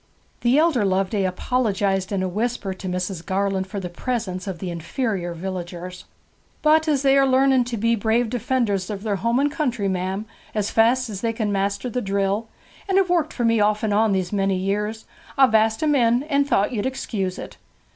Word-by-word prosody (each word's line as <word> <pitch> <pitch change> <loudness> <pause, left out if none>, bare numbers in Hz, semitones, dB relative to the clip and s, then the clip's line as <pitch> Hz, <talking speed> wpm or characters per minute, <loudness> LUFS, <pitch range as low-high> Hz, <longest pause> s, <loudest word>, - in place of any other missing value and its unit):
The 245 +3 +3
elder 310 -8 +3
Loveday 195 +1 +1
apologized 195 -1 0
in 195 -2 0
a - - 0
whisper 210 0 -2
to 190 0 -8
Mrs. 180 -1 -3
Garland 195 0 -1
for 200 +1 -5
the 185 - -4
presence 185 -1 -4
of 190 -3 -4
the 180 +1 -5
inferior 175 - -3
villagers. 180 0 -6 0.6
'But 310 +1 +4
as 285 -3 +1
they 275 0 +5
are 270 - +4
learning 260 -1 +4
to 240 -1 -4
be 230 +2 +2
brave 225 +2 +1
defenders 235 -6 0
of 205 -1 -5
their 205 -3 -1
home 235 +6 +1
and 285 +1 +2
country, 255 -9 -1
ma'am, 190 +2 -2 0.3
as 210 -1 -1
fast 245 +3 +3
as 200 -4 -6
they 230 -1 0
can 220 -2 -1
master 200 +3 -1
the 250 +1 -2
drill, 200 +2 -1 0.4
and 385 - +3
have 380 -2 +3
worked 330 -3 +1
for 240 - -2
me 230 -1 +3
off 210 +1 +2
and 215 -2 +1
on 215 +1 +3
these 185 -1 -1
many 195 -1 +1
years, 210 +4 -2 0.3
I've 265 -4 +5
asked 220 +3 +3
'em 300 -1 +3
in, 240 -1 +3
and 285 -2 +1
thought 200 - +2
you'd 225 -1 -1
excuse 200 -8 -3
it.' - - -9
210 Hz, 200 wpm, -23 LUFS, 190-250 Hz, 0.6 s, they